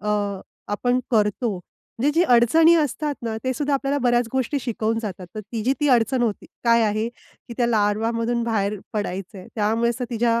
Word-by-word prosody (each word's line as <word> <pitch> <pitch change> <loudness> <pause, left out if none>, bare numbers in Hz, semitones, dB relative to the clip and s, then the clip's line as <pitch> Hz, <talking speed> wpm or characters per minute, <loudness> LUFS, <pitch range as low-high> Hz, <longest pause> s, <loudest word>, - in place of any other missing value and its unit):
अ, 210 - -4 0.6
आपण 245 +4 +1
करतो, 215 0 +1 0.5
म्हणजे 280 +4 +3
ज्या 350 - +3
अडचणी 320 +8 +6
असतात 300 -1 -1
ना, 225 -1 -3
तेसुद्धा 280 +3 0
आपल्याला 275 +1 0
बऱ्याच 240 -1 +3
गोष्टी 265 +2 0
शिकवून 225 -2 -1
जातात. 190 -4 -6
तर 215 - -4
तिची 225 +4 -2
ती 295 - +2
अडचण 245 +1 +3
होती, 220 -4 -2 0.2
काय 235 0 +5
आहे 215 +1 0
की 240 0 -15
त्या 240 - +2
लार्वामधून 230 +2 +1
बाहेर 210 -3 -1
पडायचंय, 195 -2 -4
त्यामुळे 225 +2 +1
तर - - 0
तिच्या 235 0 +1
235 Hz, 165 wpm, -23 LUFS, 215-250 Hz, 0.6 s, अडचणी